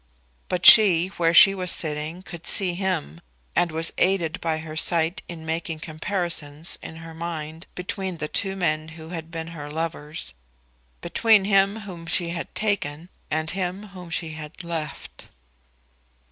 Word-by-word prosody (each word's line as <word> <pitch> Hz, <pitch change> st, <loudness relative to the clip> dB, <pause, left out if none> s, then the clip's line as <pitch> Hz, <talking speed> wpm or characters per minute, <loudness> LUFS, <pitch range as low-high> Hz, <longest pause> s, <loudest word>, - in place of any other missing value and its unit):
But 180 Hz, 0 st, -2 dB
she, 185 Hz, -5 st, +9 dB
where 170 Hz, -3 st, +1 dB
she 195 Hz, +3 st, +9 dB
was 185 Hz, -2 st, -4 dB
sitting, 155 Hz, +2 st, -3 dB
could 170 Hz, -3 st, -6 dB
see 185 Hz, -3 st, +4 dB
him, 175 Hz, -, -3 dB, 0.3 s
and 175 Hz, -2 st, +2 dB
was 165 Hz, +1 st, -2 dB
aided 180 Hz, -4 st, +1 dB
by 160 Hz, -1 st, 0 dB
her 155 Hz, -1 st, -7 dB
sight 165 Hz, +1 st, +2 dB
in 165 Hz, -2 st, -8 dB
making 160 Hz, 0 st, -3 dB
comparisons 160 Hz, -2 st, -1 dB
in 160 Hz, -, -9 dB
her 165 Hz, 0 st, -10 dB
mind 160 Hz, 0 st, -6 dB
between 185 Hz, 0 st, -4 dB
the 155 Hz, -, -3 dB
two 195 Hz, +4 st, -1 dB
men 155 Hz, -4 st, -1 dB
who 160 Hz, 0 st, -10 dB
had 165 Hz, -2 st, -6 dB
been 165 Hz, -1 st, -6 dB
her 150 Hz, -3 st, -8 dB
lovers, 160 Hz, -, -4 dB, 0.7 s
between 210 Hz, +3 st, +3 dB
him 200 Hz, +2 st, +3 dB
whom 175 Hz, -5 st, -9 dB
she 170 Hz, +1 st, +1 dB
had 170 Hz, 0 st, -5 dB
taken 175 Hz, -6 st, -1 dB, 0.2 s
and 155 Hz, +1 st, -1 dB
him 190 Hz, +2 st, -4 dB
whom 180 Hz, -3 st, -11 dB
she 165 Hz, -1 st, -2 dB
had 155 Hz, +3 st, -9 dB
left. 160 Hz, -4 st, -6 dB
170 Hz, 155 wpm, -24 LUFS, 160-185 Hz, 0.7 s, she